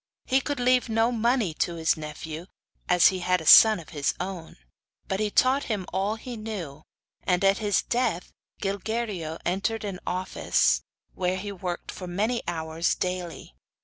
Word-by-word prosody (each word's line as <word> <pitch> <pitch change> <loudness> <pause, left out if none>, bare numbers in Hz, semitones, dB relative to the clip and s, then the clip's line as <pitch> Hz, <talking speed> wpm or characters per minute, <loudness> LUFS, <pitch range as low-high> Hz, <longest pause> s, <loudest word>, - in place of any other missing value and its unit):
He 265 +1 +2
could 285 -1 -3
leave 250 0 +3
no 225 +2 +2
money 235 -5 +1
to 170 - 0
his 165 0 +2
nephew, 155 +2 -7 0.4
as 180 -1 +6
he 185 - -3
had 180 0 +1
a 160 - -9
son 220 +4 +9
of 160 - -12
his 145 -3 -1
own; 180 -3 -6 0.5
but 190 - -2
he 215 -1 0
taught 260 +6 +3
him 205 -5 -2
all 200 +3 0
he 240 +2 -8
knew, 195 -10 -6 0.4
and 180 0 +1
at 195 0 +4
his 205 -3 +1
dead 235 -8 0 0.4
Gilguerillo 200 -4 -3
entered 200 +5 -1
an 195 -3 -4
office, 185 +1 +1 0.3
where 185 0 -1
he 200 +2 -5
worked 180 -2 -5
for 180 - -8
many 215 +7 -1
hours 160 0 -1
daily. 180 - -4
190 Hz, 165 wpm, -26 LUFS, 175-220 Hz, 0.5 s, son